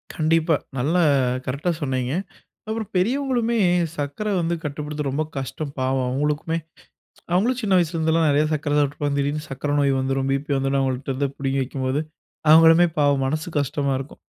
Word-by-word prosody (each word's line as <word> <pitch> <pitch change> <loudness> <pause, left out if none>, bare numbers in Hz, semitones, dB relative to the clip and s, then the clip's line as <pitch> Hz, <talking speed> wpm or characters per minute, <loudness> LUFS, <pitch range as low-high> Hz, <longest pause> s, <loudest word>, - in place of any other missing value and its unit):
கண்டிப்பா. 160 +1 +2 0.2
நல்ல 140 +7 0 0.5
கரெக்ட்டா 140 +7 -1
சொன்னீங்க. 130 -2 -1 0.5
அப்புறம் 220 -1 -3
பெரியவங்களுமே, 240 +3 +1 0.4
சர்க்கரை 145 +9 -3
வந்து 170 +1 0
கட்டுப்படுத்த 150 0 -4
ரொம்ப 145 +4 -1
கஷ்டம் 135 +2 -5
பாவம். 130 0 0
அவங்களுக்குமே 150 +5 -1 0.8
அவங்களும் 230 +8 +2
சின்ன 200 -5 +2
வயசுல 170 -1 0
இருந்துலாம் 160 0 +2
நறைய 145 +1 +3
சர்க்கரை 145 -1 -1
சாப்பிட்டுருப்பாங்க, 145 0 0
திடீர்ன்னு 145 +2 -1
சர்க்கரை 135 +2 -3
நோய் 140 -1 +3
வந்துரும், 135 0 -1
பிபி 140 +2 -1
வந்துரும். 135 +1 0
அவங்கள்ட்ட 130 0 -2
இருந்து 140 +2 -1
பிடுங்கி 135 0 -1
வைக்கும்போது, 130 +1 -2 0.5
அவங்களுமே 165 +2 +7
பாவம் 140 -2 +3
மனசு 155 +5 -2
கஷ்டமா 140 0 -1
இருக்கும். 135 +2 -9
145 Hz, 145 wpm, -23 LUFS, 135-165 Hz, 0.8 s, அவங்களுமே